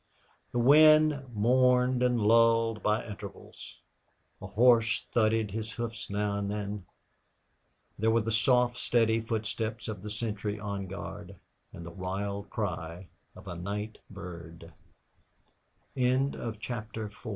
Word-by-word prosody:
The - - -3
wind 155 +2 +6
mourned 125 +3 +3
and 125 -1 +2
lulled 115 0 +3
by 105 +2 0
intervals; 100 -3 -10 0.6
a - - -6
horse 115 0 +4
thudded 110 -2 +2
his 110 +1 -4
hoofs 115 -1 -5
now 100 0 -1
and 100 0 -3
then; 105 -2 -4 1.1
there 110 +2 +2
were 115 +1 +3
the 115 +1 -2
soft, 125 +2 +3
steady 115 -2 +2
footsteps 110 0 -3
of 105 -4 -5
the 105 - -7
sentry 105 -1 -3
on 100 -2 -4
guard, 100 +2 -8 0.4
and 85 - -9
the 85 - -8
wild 100 +3 -4
cry 90 -3 -4 0.3
of - - -13
110 Hz, 105 wpm, -29 LUFS, 100-120 Hz, 1.1 s, wind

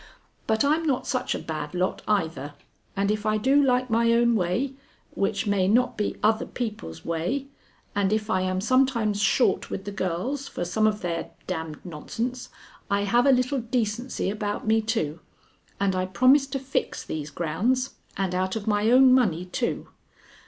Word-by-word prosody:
But 220 +4 +2
I'm 305 +3 +3
not 285 -6 0
such 255 -1 -1
a - - -1
bad 155 0 -5
lot 180 +1 -1
either, 160 -8 -1 0.4
and 200 +1 +2
if 210 0 -2
I 215 -1 +1
do 270 +6 +4
like 255 -2 +2
my 230 +1 +3
own 235 0 +4
way, 205 +8 0 0.4
which 200 +1 -1
may 200 -3 +2
not 245 +4 +3
be 210 - -2
other 220 +1 +2
people's 210 - -5
way, 175 +12 -1 0.5
and 200 -1 +1
if 215 0 0
I 185 -4 +1
am 185 0 -1
sometimes 235 -4 +2
short 215 +5 +2
with 195 - -5
the 205 - -4
girls 200 +10 -2
for 175 - -4
some 215 +5 +2
of 210 -1 -1
their 170 -2 -3 0.2
d 185 - -2
d 160 -2 -5
nonsense, 230 +10 -5 0.4
I 200 0 +2
have 240 +6 +3
a - - +7
little 255 +1 +2
decency 235 -2 -2
about 205 0 -3
me, 220 +1 +3
too, 215 -9 -2 0.6
and 195 -1 +1
I 185 0 0
promise 255 +9 +4
to 270 - -3
fix 270 0 -2
these 155 -1 -5
grounds, 220 - 0 0.3
and 190 -2 -1
out 185 +2 -1
of 215 -2 -4
my 210 0 +2
own 255 +1 +7
money, 190 -10 +2
too. 235 +6 -2
215 Hz, 180 wpm, -25 LUFS, 185-250 Hz, 0.6 s, a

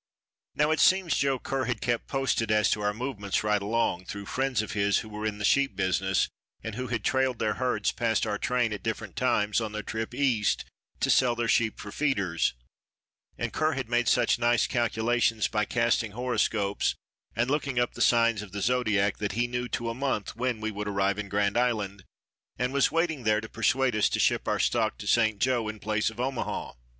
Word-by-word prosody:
Now 150 +1 +2
it 155 - +1
seems 185 -3 +4
Joe 135 -1 +1
Kerr 135 +1 -2
had 125 -3 -2
kept 120 -2 -1
posted 135 -5 0
as 105 -1 +3
to 105 - 0
our 105 0 +1
movements 105 -4 -3
right 105 -1 +1
along 100 -4 0
through 100 +1 -7
friends 130 0 0
of 110 - -6
his 100 0 +2
who - - -10
were 105 0 -4
in 105 -1 -3
the 105 - -2
sheep 135 -2 +3
business 95 0 +1 0.4
and 110 - -5
who 125 +3 -4
had 115 -3 -2
trailed 130 0 +1
their 110 -1 0
herds 125 -5 0
past 115 -1 0
our 105 -2 -2
train 125 -3 0
at 100 - -6
different - - -4
times 105 +2 +1
on 110 -1 -4
their 105 0 -4
trip 110 +3 -4
East 125 -7 +1 0.4
to - - +3
sell 125 -2 +4
their 120 0 -1
sheep 110 -1 +1
for 105 - -8
feeders, 100 - 0 0.8
and - - -3
Kerr 155 0 +1
had 130 -4 -4
made 120 0 +1
such 120 -1 +3
nice 120 0 +3
calculations 115 -1 +1
by 105 0 0
casting 115 -2 0
horoscopes 110 -4 0 0.4
and 120 +3 0
looking 140 -3 -1
up 120 0 +1
the 120 - -7
signs 115 -3 +4
of 100 -3 -10
the 100 - -4
zodiac 105 -5 +1
that 100 -2 -3
he 120 +3 +1
knew 125 0 -3
to 120 -1 -3
a 115 - -1
month 130 -5 -2
when 120 -1 -1
we 110 0 -2
would 105 0 -5
arrive 100 0 0
in 105 -1 -5
Grand 100 0 +1
Island, 105 -6 -1 0.5
and 125 +1 -1
was 140 -1 +3
waiting 165 -3 0
there 110 -2 +2
to 110 - -7
persuade 125 +3 +1
us 105 - +3
to - - -1
ship - - +2
our - - +1
stock - - +1
to - - -8
St. 110 -3 +3
Joe 120 0 +1
in 110 0 -5
place 110 0 0
of 110 +1 -12
Omaha. 130 0 -3
115 Hz, 210 wpm, -27 LUFS, 105-125 Hz, 0.8 s, seems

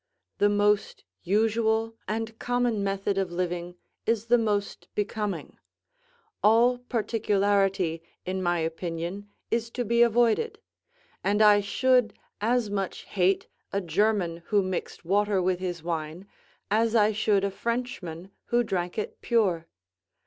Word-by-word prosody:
The 205 - +5
most 205 0 +1 0.2
usual 220 +3 +1
and 225 +1 -3
common 245 -4 0
method 195 0 -1
of 190 -2 -1
living 175 0 -3 0.3
is 225 -1 +1
the 240 +1 +4
most 205 -3 -1
becoming; 210 -1 -3 0.8
all 235 +3 +4
particularity, 200 -7 +1 0.2
in 185 +1 -2
my 175 -1 +1
opinion, 170 +4 -4 0.2
is 230 0 0
to 245 +1 -3
be 235 +2 +2
avoided; 240 - +3 0.7
and 205 +2 +1
I 210 -1 +7
should 245 +2 +2 0.3
as 235 +1 +2
much 195 -2 -2
hate 190 0 +1 0.2
a 200 - 0
German 185 -1 +1
who 205 -2 +3
mixed 185 -2 -4
water 205 +2 +2
with 180 0 +1
his 175 -3 -4
wine, 165 +1 -4 0.5
as 225 +2 +2
I 215 -1 +5
should 210 -2 +2
a 200 - 0
Frenchman 195 -6 -4
who 240 0 +2
drank 180 -4 -3
it 215 - -4
pure. 190 -9 +1
205 Hz, 130 wpm, -27 LUFS, 185-225 Hz, 0.8 s, I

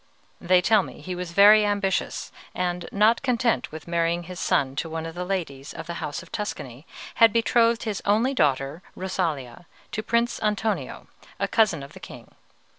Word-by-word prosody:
They 180 0 +3
tell 215 0 +5
me - - -10
he 185 - -6
was 180 -1 -5
very 205 +4 +7
ambitious, 205 -2 -1 0.2
and, 180 -1 -2
not 215 +3 +3
content 245 -3 0
with 155 +1 -9
marrying 170 0 0
his 180 +1 -8
son 135 -1 +1
to 165 - -2
one 160 0 -4
of 165 - -6
the 180 +1 -4
ladies 165 -8 -4
of 165 - -7
the 170 - -5
House 145 - -4
of - - -18
Tuscany, 140 - -6 0.3
had 225 -1 +8
betrothed 230 0 +2
his 215 -3 -3
only 225 +6 +2
daughter, 140 - 0
Rosalia, 165 -7 -3 0.2
to 215 - -2
Prince 235 +2 0
Antonio, 215 0 -2 0.3
a - - 0
cousin 195 - +2
of 140 - -11
the - - -11
king. - - -12
185 Hz, 180 wpm, -25 LUFS, 165-215 Hz, 0.3 s, had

